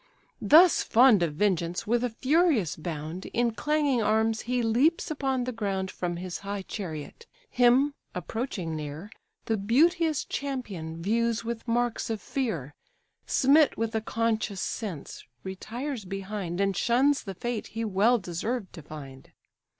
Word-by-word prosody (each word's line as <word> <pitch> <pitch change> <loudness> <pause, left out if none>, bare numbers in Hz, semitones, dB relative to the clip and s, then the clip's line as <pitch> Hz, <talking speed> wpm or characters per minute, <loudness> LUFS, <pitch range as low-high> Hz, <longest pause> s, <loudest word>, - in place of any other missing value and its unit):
Thus 340 +3 +7
fond 235 -4 +5
of 160 -4 0
vengeance, 175 -2 0
with 235 +3 +1
a 250 - +1
furious 265 - +2
bound, 160 +2 -5
In 240 0 +2
clanging 290 0 +1
arms 220 +1 +2
he 250 -1 +1
leaps 260 +10 +2
upon 270 -4 -1
the 255 - -2
ground 195 -4 -2
From 175 -1 -3
his 180 0 -5
high 200 0 -4
chariot: 185 - -7 0.2
him, 250 +4 +4 0.2
approaching 180 -3 -3
near, 155 +6 -6 0.3
The 225 - 0
beauteous 310 - +2
champion 195 - -5
views 230 +3 0
with 235 0 -5
marks 240 0 0
of 220 -2 -2
fear, 175 - -3 0.5
Smit 285 +2 +4
with 225 +1 -1
a 220 - 0
conscious 220 -3 -1
sense, 195 - -5 0.2
retires 230 +7 -5
behind, 195 -2 -4
And 195 -1 +1
shuns 270 +7 +3
the 195 -2 -6
fate 240 +3 -3
he 225 0 -4
well 215 +4 +3
deserved 195 +3 -4
to 165 - -9
find. 140 -3 -10
220 Hz, 140 wpm, -27 LUFS, 185-250 Hz, 0.5 s, Thus